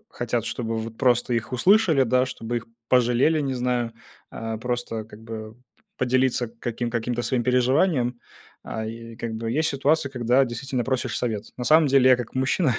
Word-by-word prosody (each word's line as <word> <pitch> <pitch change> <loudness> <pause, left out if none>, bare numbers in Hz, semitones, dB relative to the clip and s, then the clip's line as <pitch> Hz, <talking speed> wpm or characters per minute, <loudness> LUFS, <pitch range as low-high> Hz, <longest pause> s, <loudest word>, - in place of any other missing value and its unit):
хотят, 120 -1 -2
чтобы 115 -1 -3
вот 110 0 -6
просто 120 -1 +2
их 115 +2 -2
услышали, 170 - +4
да, 125 +1 +3
чтобы 120 -2 -4
их 115 - -4 0.2
пожалели, 125 +5 +3
не 135 -2 -1
знаю. 125 -2 -1 0.4
А, 115 0 -5
просто, 120 -1 -3
как 105 0 -14
бы, 110 -1 -7
п-поделиться 130 - -1
каким 120 0 -3
каким-то 120 +1 -2
своим 120 +1 0
переживанием. 125 0 +2 0.5
А, 110 0 -4
и 115 +1 -8
как 115 -1 -4
бы 115 0 -3
есть 160 +4 +1
ситуации, 145 +2 +1
когда 125 0 +2
действительно 130 0 -3
просишь 130 -1 -1
совет. 110 -4 -2
На 125 - -4
самом 155 +3 +5
деле 130 -1 +5
я 130 - +7
как 120 -2 -7
мужчина 130 +1 +1
125 Hz, 175 wpm, -24 LUFS, 115-130 Hz, 0.5 s, я